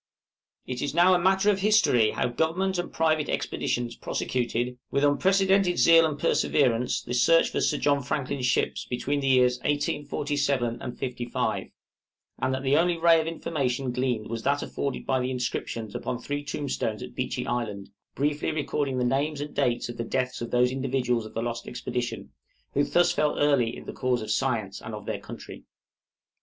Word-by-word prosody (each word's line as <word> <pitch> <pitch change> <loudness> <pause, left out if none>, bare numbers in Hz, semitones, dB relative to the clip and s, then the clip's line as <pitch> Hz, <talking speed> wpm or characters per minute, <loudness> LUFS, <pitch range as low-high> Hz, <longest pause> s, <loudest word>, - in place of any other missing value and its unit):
It 125 -1 -4
is 145 - -2
now 175 +2 +6
a 180 - +4
matter 190 +3 +3
of 195 - -1
history 195 - +4
how - - -1
Government 175 +8 0
and 175 - -4
private 155 -2 +1
expeditions 120 -1 -2
prosecuted, 125 0 -2
with 140 - 0
unprecedented 190 +6 +3
zeal 165 +5 +6
and 150 -2 -4
perseverance, 130 -5 +1
the 120 - -5
search 125 +7 +4
for - - -1
Sir 150 - +1
John 145 0 +2
Franklin's 135 -1 -2
ships, - - 0
between 135 +3 -2
the 135 - -2
years 125 -1 +4
1847 145 -4 -1
55; 125 -2 -2 0.7
and - - 0
that 130 0 -2
the 135 +1 +3
only 175 +1 +2
ray 165 0 +5
of 160 - -5
information 135 -6 -2
gleaned 125 -3 -1
was 115 0 -4
that 140 +4 +1
afforded 140 -2 -4
by 130 - +1
the 125 0 -1
inscriptions 120 -3 -3
upon 125 - -3
three 145 +3 -4
tombstones 140 -6 -3
at - - -9
Beechey - - -3
Island, 110 -5 -3 0.2
briefly 145 +2 0
recording 145 -3 -1
the 125 - +1
names 140 +4 0
and 145 0 -5
dates 125 -4 0
of 120 -1 -7
the 115 - -2
deaths 125 +1 -2
of 120 - -4
those 125 0 +3
individuals 130 -3 -1
of - - -16
the 115 - -1
lost 120 -1 -4
expedition, 120 0 -4 0.4
who 145 - +3
thus 175 +3 +2
early 145 -5 +2
fell - - -8
in - - -11
the - - -6
cause 125 -3 0
of 110 - -4
science 110 -4 -1
and 110 0 -6
of 105 - -9
their - - -3
country. - - -10
135 Hz, 180 wpm, -26 LUFS, 120-150 Hz, 0.7 s, now